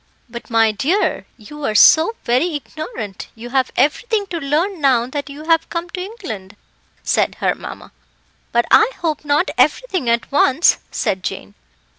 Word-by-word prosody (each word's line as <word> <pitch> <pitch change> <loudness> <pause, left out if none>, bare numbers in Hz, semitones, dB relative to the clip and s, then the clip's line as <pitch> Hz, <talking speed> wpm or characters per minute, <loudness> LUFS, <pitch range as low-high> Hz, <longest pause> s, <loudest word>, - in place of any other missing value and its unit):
"But, 235 0 -9
my 225 -1 +3
dear, 305 - 0
you 295 +7 -11
are 215 -5 -1
so 325 - +6
very 280 +8 +1
ignorant, 290 - -7
you 235 +2 -9
have 260 -1 +1
everything 410 - +1
to 340 - -2
learn 320 +6 -1
now 255 -4 +3
that 285 +2 -5
you 285 +2 -9
have 325 0 +2
come 340 0 -4
to 365 - -5
England," 225 - -8 0.5
said - - +1
her - - 0
mamma. - - -10 0.6
"But 235 0 +2
I 440 +1 +6
hope 315 -4 -2
not 295 +5 +1
everything 370 - +1
at 235 0 0
once," 280 +3 +3
said 190 - -2
Jane. 100 - -6
290 Hz, 160 wpm, -19 LUFS, 235-340 Hz, 0.6 s, so